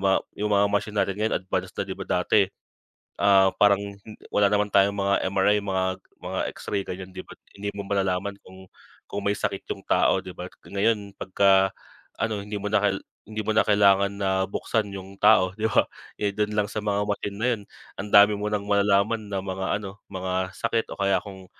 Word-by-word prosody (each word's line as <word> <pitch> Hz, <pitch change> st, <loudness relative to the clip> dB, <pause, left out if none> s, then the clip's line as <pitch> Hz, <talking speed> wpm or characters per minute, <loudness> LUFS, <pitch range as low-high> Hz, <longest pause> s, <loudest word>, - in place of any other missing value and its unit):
mga 95 Hz, 0 st, +3 dB, 0.2 s
yung 105 Hz, -, 0 dB
mga 100 Hz, -1 st, +4 dB
machine 105 Hz, +1 st, -1 dB
natin 100 Hz, -, +2 dB
ngayon 110 Hz, -, +1 dB
advance 95 Hz, -, -2 dB
na -, -, -1 dB
'di -, -, -5 dB
ba, -, -, -6 dB
dati, -, -, +3 dB, 0.7 s
ah, 95 Hz, -1 st, +5 dB
parang 100 Hz, -1 st, +5 dB, 0.5 s
wala 105 Hz, -, +3 dB
naman 105 Hz, +1 st, +2 dB
tayong 100 Hz, 0 st, +4 dB
mga 100 Hz, 0 st, +1 dB
MRI 100 Hz, +2 st, +3 dB
mga 95 Hz, -2 st, -1 dB, 0.4 s
mga -, -, -4 dB
X-ray 100 Hz, -1 st, -3 dB
ganyan 95 Hz, +1 st, -6 dB
'di 95 Hz, 0 st, -9 dB
ba, -, -, -12 dB, 0.2 s
hindi 100 Hz, 0 st, -4 dB
mo 100 Hz, -, -5 dB
malalaman 100 Hz, 0 st, -1 dB
kung, 95 Hz, 0 st, -14 dB, 0.4 s
kung 100 Hz, -, -2 dB
may 100 Hz, -, +1 dB
sakit -, -, -3 dB
yung -, -, -5 dB
tao -, -, +2 dB
'di -, -, -8 dB
ba, -, -, -7 dB
k -, -, -24 dB, 0.2 s
ngayon 100 Hz, 0 st, +1 dB
'pagka, 95 Hz, 0 st, +3 dB, 0.4 s
ano 110 Hz, -2 st, -1 dB
hindi 105 Hz, +1 st, -6 dB
mo 100 Hz, -, -7 dB
na 110 Hz, -, +4 dB
kal 100 Hz, -2 st, +2 dB, 0.3 s
hindi 110 Hz, 0 st, -5 dB
mo 110 Hz, -, +1 dB
na -, -, +6 dB
kailangan 100 Hz, -1 st, +4 dB
na 95 Hz, -, 0 dB, 0.2 s
buksan 110 Hz, +1 st, -1 dB
yung 95 Hz, +1 st, -10 dB
tao, 105 Hz, -3 st, +5 dB
'di 110 Hz, +1 st, 0 dB
ba, -, -, +4 dB, 0.4 s
eh, 105 Hz, -1 st, 0 dB
dun 105 Hz, 0 st, -1 dB
lang 105 Hz, -1 st, +2 dB
sa -, -, -2 dB
mga 105 Hz, -1 st, 0 dB
machine 100 Hz, 0 st, -3 dB
na 115 Hz, +4 st, 0 dB
'yun 110 Hz, -, -6 dB, 0.4 s
ang 100 Hz, +2 st, -4 dB
dami 105 Hz, +1 st, +8 dB
mo 105 Hz, -, -2 dB
nang 105 Hz, -1 st, -1 dB
malalaman 100 Hz, +2 st, +2 dB
na 95 Hz, -2 st, -3 dB
mga 95 Hz, 0 st, -4 dB
ano, 100 Hz, -1 st, -9 dB
mga 95 Hz, 0 st, -2 dB
sakit 115 Hz, -1 st, -1 dB
o -, -, -26 dB
kaya 100 Hz, -1 st, +2 dB
kung 95 Hz, -2 st, -11 dB
100 Hz, 205 wpm, -25 LUFS, 95-105 Hz, 0.7 s, dami